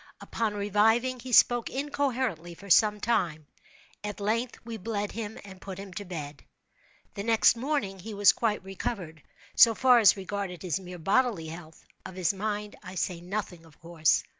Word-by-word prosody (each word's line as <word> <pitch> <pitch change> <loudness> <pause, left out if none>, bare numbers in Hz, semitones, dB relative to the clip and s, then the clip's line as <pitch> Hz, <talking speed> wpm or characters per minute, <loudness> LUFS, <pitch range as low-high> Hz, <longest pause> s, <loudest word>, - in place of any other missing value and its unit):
Upon 220 -2 -3
reviving 225 +5 +2
he 250 +2 -8
spoke 240 0 +5
incoherently 260 - -2
for 200 +2 -9
some 210 +3 +5
time. 170 -9 -1 0.6
At 210 0 -5
length 230 +4 -1
we 230 -1 -6
bled 205 0 -3
him 220 -1 -6
and 190 -2 -12
put 190 -2 -7
him 195 -1 -9
to 205 +1 -6
bed. 150 -6 -7 0.7
The 200 - -5
next 225 +2 +4
morning 235 -7 -2
he 210 +3 -8
was 200 -1 +6
quite 215 -4 -1
recovered, 190 -4 -5 0.3
so 230 -1 +7
far 250 0 +5
as 205 -3 +6
regarded 195 -3 -5
his 180 0 -1
mere 180 -1 -9
bodily 195 -1 +1
health. 160 -1 -11 0.2
Of 185 - -9
his 185 0 +1
mind 210 +1 -4
I 185 +1 -10
say 180 -1 -2
nothing, 180 -2 -5
of 160 -2 -20
course. 165 -2 +1
200 Hz, 170 wpm, -28 LUFS, 180-225 Hz, 0.7 s, so